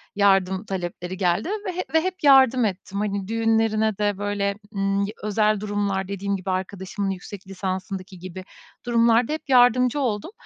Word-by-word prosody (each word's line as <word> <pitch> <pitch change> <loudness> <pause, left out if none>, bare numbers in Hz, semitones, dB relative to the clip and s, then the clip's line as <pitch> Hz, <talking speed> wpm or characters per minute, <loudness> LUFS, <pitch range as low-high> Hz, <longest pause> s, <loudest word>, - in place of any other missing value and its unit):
yardım 195 -1 +2
talepleri 180 -1 -5
geldi 180 - 0 0.2
ve 370 - -2
hep 365 - -5
ve 320 - +4
hep 370 +2 -2
yardım 265 -3 +6
ettim. 195 0 -4
Hani, 200 -2 -2
düğünlerine 225 -1 +1
de 205 -2 0
böyle, 200 0 -1 0.2
ımm, 195 0 0
y 200 +1 -2
özel 215 0 +2
durumlar, 200 -2 -2
dediğim 200 0 -2
gibi, 190 0 -5
arkadaşımın 190 +1 -3
yüksek 190 +1 -7
lisansındaki 190 -1 -5
gibi 185 +1 -8 0.4
durumlarda 235 +3 +3
hep 310 -2 -6
yardımcı 250 +1 +4
oldum. 230 - -2
200 Hz, 155 wpm, -23 LUFS, 190-225 Hz, 0.4 s, yardım